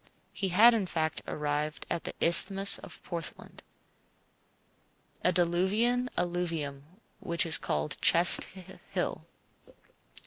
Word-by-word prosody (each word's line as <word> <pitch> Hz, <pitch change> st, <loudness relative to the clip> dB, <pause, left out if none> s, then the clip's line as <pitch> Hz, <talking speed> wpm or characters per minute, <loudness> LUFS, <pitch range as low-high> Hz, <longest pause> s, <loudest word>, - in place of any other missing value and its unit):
He 195 Hz, -, -4 dB
had, 220 Hz, +7 st, +5 dB
in 210 Hz, -5 st, -2 dB
fact, 160 Hz, -2 st, -3 dB
arrived 150 Hz, +1 st, -5 dB
at 170 Hz, -, -6 dB
the -, -, -6 dB
Isthmus 195 Hz, +3 st, +5 dB
of -, -, -14 dB
Portland, 170 Hz, -2 st, -9 dB, 1.6 s
a 180 Hz, -, +2 dB
diluvian 195 Hz, +9 st, -1 dB
alluvium 165 Hz, -6 st, -5 dB, 0.3 s
which 170 Hz, -1 st, -1 dB
is 160 Hz, -, +6 dB
called 75 Hz, 0 st, -4 dB
Chess 170 Hz, +1 st, +7 dB, 0.5 s
Hill. -, -, -5 dB
175 Hz, 105 wpm, -27 LUFS, 160-195 Hz, 1.6 s, Chess